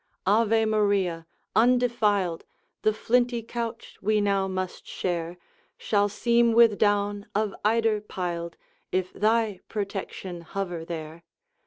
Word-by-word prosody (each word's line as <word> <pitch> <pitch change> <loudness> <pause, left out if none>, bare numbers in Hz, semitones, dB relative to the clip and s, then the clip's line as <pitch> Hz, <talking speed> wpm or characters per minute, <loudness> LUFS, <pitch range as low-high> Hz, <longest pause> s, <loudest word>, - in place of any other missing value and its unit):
Ave 225 +2 +3
Maria! 200 -6 +1 0.3
undefiled! 225 -7 +2 0.4
The 215 - +3
flinty 240 +2 +1
couch 230 0 -6
we 215 +1 +2
now 200 -1 +1
must 185 -1 -4
share 175 -1 -3 0.4
Shall 205 -1 +1
seem 235 +2 +2
with 230 -2 +5
down 205 0 +1
of 215 -1 0
eider 220 0 +2
piled, 175 -4 -4 0.3
If 185 0 -1
thy 215 -2 +1
protection 195 -3 -5
hover 175 -1 -4
there. 160 -1 -7
205 Hz, 115 wpm, -26 LUFS, 185-225 Hz, 0.4 s, with